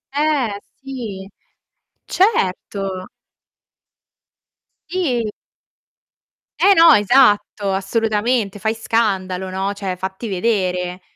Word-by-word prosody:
Eh, 285 -9 0 0.2
sì, 230 -8 -7 0.8
certo! 195 - -1 1.8
Sì! 315 -10 0 1.4
Eh 400 - +6
no, 330 -2 +8
esatto, 210 -3 +3
assolutamente. 210 +1 0
Fai 220 +2 0
scandalo, 190 -5 -1
no, 190 +2 -2
cioè 195 -2 -4
fatti 190 +5 -5
vedere. 185 -3 -1
205 Hz, 75 wpm, -19 LUFS, 190-245 Hz, 1.8 s, no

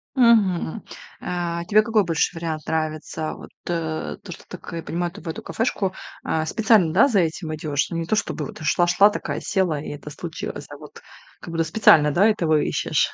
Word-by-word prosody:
Мгм. 220 - +3 0.4
А 170 -1 -3
тебе 210 +4 +4
какой 215 -2 +2
больше 165 +1 0
вариант 160 -2 -4
нравится? 155 0 -2
Вот - - -12
то, 160 -2 -3
что - - -9
ты, - - -9
как - - -10
я 165 - -4
понимаю, 175 +2 -2
ты - - -12
в 170 - -7
эту 160 - -5
кафешку, 200 -5 -1 0.3
а, 160 0 -1
специально, 210 -2 +3
да, 275 - +5
за 210 -7 +3
этим 160 -1 -2
идешь. 150 -2 -1
Ну, 170 - -3
не 165 - -2
то 195 - +1
чтобы 160 -7 -2
вот - - -8
шла 175 +3 +2
шла, 180 +4 +6
такая 210 - -4
села, 180 -7 0
и - - -8
это 145 0 -8
случилось, 165 +2 -6
а - - -9
вот - - -13 0.4
как - - -9
будто 165 0 +1
специально, 160 -4 +5
да, 195 +8 +4
этого 165 -8 +2
ищешь? - - 0
170 Hz, 200 wpm, -23 LUFS, 155-195 Hz, 0.4 s, шла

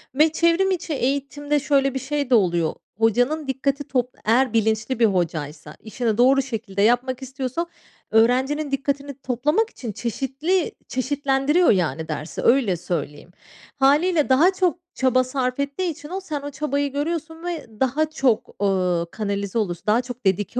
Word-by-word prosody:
ve 305 +3 +4
çevrim 335 +4 +2
içi 335 -3 -2
eğitimde 285 +2 -1
şöyle 275 -2 +2
bir 265 - -2
şey 280 +1 -2
de 250 - +5
oluyor. 175 -5 +2 0.2
Hocanın 245 +7 +1
dikkati 275 +2 -1
top 250 -2 -1
eğer 240 +2 +3
bilinçli 220 +2 0
bir 230 - +6
hocaysa 155 -6 -2
işini 225 0 -2
doğru 265 +3 +5
şekilde 225 -6 -4
yapmak 245 +4 +2
istiyorsa, 265 +4 -3 0.5
öğrencinin 260 +6 +2
dikkatini 280 +1 -2
toplamak 300 - +1
için 240 - -7
çeşitli 270 - -1 0.2
çeşitlendiriyor 280 +4 +2
yani 160 -5 0
dersi, 155 0 -5
öyle 235 -8 +3
söyleyeyim. 160 -1 -5 0.4
Hâliyle 300 +4 +3
daha 315 +9 +5
çok 365 -2 0
çaba 255 -1 +2
sarf 255 0 -2
ettiği 280 +6 -1
için 305 0 -11
o, 375 - -3
sen 300 -6 -4
o 285 +1 -6
çabayı 285 0 -1
görüyorsun 320 +2 -3
ve 345 -5 -4
daha 285 +4 +1
çok, 265 -7 +1
eee, 180 -3 +1
kanalize 200 -1 -3
olursun, 175 -5 -3
daha 220 +3 +4
çok 245 -2 -9
dedike 200 +6 0
265 Hz, 150 wpm, -23 LUFS, 220-290 Hz, 0.5 s, bir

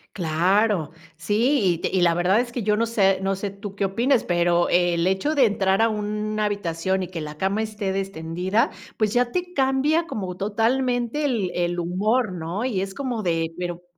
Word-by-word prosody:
Claro, 180 +1 +1 0.2
sí, 220 - +1
y - - -6
te - - -2
y 185 - 0
la 170 -1 +4
verdad 185 +6 +3
es 240 -1 -6
que 235 -3 -4
yo 210 0 +2
no 230 +2 +1
sé 195 -4 +2
no 195 0 -1
sé 200 0 -3
tú 200 0 -9
qué 200 - +1
opines, 240 +6 +1
pero 175 0 +2
el 175 0 +2
hecho 190 +12 0
de 265 -3 +5
entrar 195 -1 +1
a 225 - +5
una 215 0 -2
habitación 190 -2 -1
y - - -5
que 170 -3 -6
la 150 0 -7
cama 195 +4 0
esté 210 -3 -3
destendida, 190 +2 -1 0.3
pues 215 -1 +1
ya 245 0 +2
te 360 0 -3
cambia 280 +5 +2
como 185 - -4
totalmente 240 +6 0
el 225 -10 0
el 175 0 -1
humor, 200 +5 0
¿no? 175 +7 -3
Y 200 -7 -1
es 195 0 -4
como 245 -5 -3
de 165 -1 -1
pero 175 -1 -4
200 Hz, 195 wpm, -23 LUFS, 180-230 Hz, 0.3 s, de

